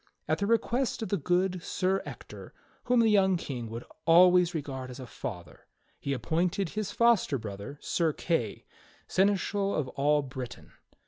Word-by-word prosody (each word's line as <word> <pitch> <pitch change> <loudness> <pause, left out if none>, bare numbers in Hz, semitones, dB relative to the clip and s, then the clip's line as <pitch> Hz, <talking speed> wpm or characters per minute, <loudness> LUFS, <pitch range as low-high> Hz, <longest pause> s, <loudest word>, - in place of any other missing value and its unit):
At - - +1
the 200 - 0
request 230 +2 +1
of 220 - -4
the 200 - +1
good 180 +3 0
Sir 190 +3 0
Ector, - - -10 0.3
whom 245 -1 +4
the 225 -1 +4
young 190 -3 +4
King 125 -8 -5
would 115 +2 -6 0.2
always 180 +1 +6
re 160 - 0
gard 130 -2 -6
as 125 - -9
a 130 - -7
father, 90 -6 -8 0.3
he 140 - -3
appointed 170 - 0
his 210 +1 -3
foster 230 -10 +3
brother. 105 +4 -7
Sir 165 -2 +1
Kay, 150 - -2 0.4
seneschal 200 +1 +1
of 140 -4 -1
all 145 +2 +2
Britain. 130 -2 -8
170 Hz, 165 wpm, -29 LUFS, 130-195 Hz, 0.4 s, always